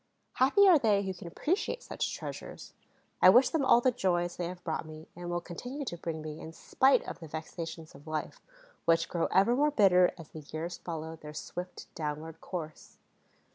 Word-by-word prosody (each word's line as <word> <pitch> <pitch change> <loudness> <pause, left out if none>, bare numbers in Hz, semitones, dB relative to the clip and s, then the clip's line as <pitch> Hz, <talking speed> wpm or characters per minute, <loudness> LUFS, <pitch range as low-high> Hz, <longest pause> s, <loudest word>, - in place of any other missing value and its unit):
Happy 280 +11 +5
are 350 -5 +7
they 210 -5 +3
who 190 -1 -3
can 175 -1 -10
appreciate 380 - -1
such - - -3
treasures! - - -8 0.5
I 185 - +9
wish 245 +6 +7
them 315 -3 0
all 240 -2 +6
the 255 - +3
joys 175 -6 0
they 175 - -3
have 180 0 -8
brought 160 -2 -2
me 155 0 -10
and 175 0 -6
will 175 0 0
continue 245 - -6
to 175 - -4
bring 165 -2 -5
me, 155 0 -6
in 160 - -9
spite 265 +10 +3
of - - -6
the 165 - -9
vexations 160 +1 -7
of 145 +3 -15
life, 155 -1 -4 0.4
which 165 0 +3
grow 170 -2 0
ever 200 +6 +4
more 295 +3 +3
bitter 190 -9 +5
as 165 -3 -11
the 155 - -9
years 155 +4 -6
follow 160 -1 -6
their 150 -1 -10
swift 180 +4 -6
downward 155 +1 -5
course. 160 -4 -7
175 Hz, 195 wpm, -30 LUFS, 160-215 Hz, 0.5 s, I